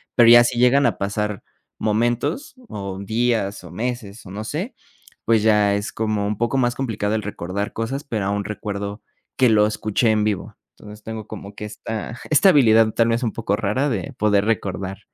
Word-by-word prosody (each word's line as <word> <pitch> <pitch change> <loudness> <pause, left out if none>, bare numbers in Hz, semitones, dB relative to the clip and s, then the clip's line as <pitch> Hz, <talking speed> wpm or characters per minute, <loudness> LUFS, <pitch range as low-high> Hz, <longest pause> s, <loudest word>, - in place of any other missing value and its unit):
Pero 120 -2 +7
ya 120 0 +9
si 120 0 -1
llegan 125 +3 +4
a - - -1
pasar 105 +1 -2 0.4
momentos, 120 - -1
o 100 -2 -5
días, 110 -2 -1
o 90 - -10
meses, 115 +1 -5
o 95 - -10
no 105 +2 -5
sé, 170 - -4 0.5
pues, 110 -2 +3
ya 105 -2 +4
es 100 +1 -3
como 110 -2 -1
un 105 0 -2
poco 120 +4 0
más 120 -2 +2
complicado 110 -5 -2
el 110 - -1
recordar 100 0 -4
cosas. 130 +6 -3
Pero 110 -7 -3
aún 100 +1 -1
recuerdo 100 0 -5 0.3
que 130 -2 +5
lo 105 -1 +4
escuché 110 +2 0
en 105 -1 +2
vivo. 105 -3 -2 0.2
Entonces, 105 0 -12
tengo 110 -1 -7
como 100 -1 -9
que 105 - -6
esta 110 +2 -6
esta 155 +6 +6
habilidad, 115 -8 +5
tal 115 0 +2
vez 115 +1 +1
un 115 - -1
poco 105 -3 -1
rara, 115 +7 0
de 100 -9 -3
poder 105 -1 +2
recordar 100 -3 -2
110 Hz, 190 wpm, -22 LUFS, 100-120 Hz, 0.5 s, ya